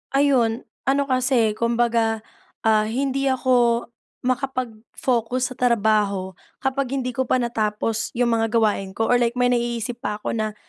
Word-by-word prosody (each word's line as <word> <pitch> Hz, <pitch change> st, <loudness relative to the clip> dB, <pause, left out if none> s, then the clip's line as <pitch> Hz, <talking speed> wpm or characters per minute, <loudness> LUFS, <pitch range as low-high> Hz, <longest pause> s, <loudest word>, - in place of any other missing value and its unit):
Ayun. 255 Hz, -5 st, +2 dB, 0.2 s
Ano 275 Hz, +1 st, +3 dB
kasi, 255 Hz, -4 st, +2 dB
kumbaga, 230 Hz, 0 st, +1 dB, 0.4 s
ah, 215 Hz, -1 st, +3 dB
hindi 275 Hz, +3 st, -1 dB
ako 245 Hz, -3 st, +2 dB, 0.4 s
makapagfocus 250 Hz, -1 st, -2 dB
sa -, -, -7 dB
trabaho 210 Hz, -5 st, +2 dB, 0.3 s
kapag 265 Hz, 0 st, -1 dB
hindi 250 Hz, -1 st, -2 dB
ko 260 Hz, -1 st, -1 dB
pa -, -, +4 dB
natapos 225 Hz, -2 st, -1 dB
'yong 245 Hz, 0 st, +3 dB
mga 225 Hz, -, +1 dB
gawain 210 Hz, -4 st, +1 dB
ko 225 Hz, -, 0 dB
or 245 Hz, -, +4 dB
like 235 Hz, 0 st, +1 dB
may 245 Hz, 0 st, +3 dB
naiisip 240 Hz, -1 st, -1 dB
pa 210 Hz, +1 st, -2 dB
'ko -, -, -3 dB
na 215 Hz, -1 st, -2 dB
235 Hz, 145 wpm, -22 LUFS, 220-255 Hz, 0.4 s, pa